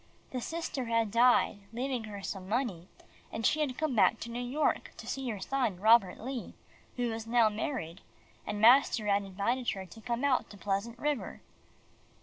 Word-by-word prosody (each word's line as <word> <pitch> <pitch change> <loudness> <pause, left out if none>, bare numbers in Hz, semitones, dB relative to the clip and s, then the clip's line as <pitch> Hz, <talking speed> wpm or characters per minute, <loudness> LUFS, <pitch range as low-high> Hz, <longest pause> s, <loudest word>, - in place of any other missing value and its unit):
The 255 - -3
sister 320 -3 -3
had 230 -2 +1
died 235 -2 +4
leaving 245 0 -2
her 205 -2 -8
some 190 -1 -5
money, 210 -7 -1 0.4
and 225 - -3
she 310 - +3
had 280 -5 -1
come 310 -5 -1
back 205 +1 +4
to 235 - -6
New 240 - -4
York 265 +5 -1
to - - -9
see 265 -2 -3
her 210 -4 -4
son 230 -3 -1
Robert 215 -2 +5
Lee, 250 +1 -6 0.4
who 245 -2 -1
was 225 0 -5
now 230 -1 +4
married, 210 - -4 0.5
and 205 - -3
master 235 -1 +5
had 200 0 +3
invited 200 +6 -1
her 190 -2 -6
to 185 +5 -13
come 240 +2 -2
out 275 -3 +2
to 205 - -12
Pleasant 200 +4 -2
River. 290 +1 -2
230 Hz, 180 wpm, -31 LUFS, 205-255 Hz, 0.5 s, Robert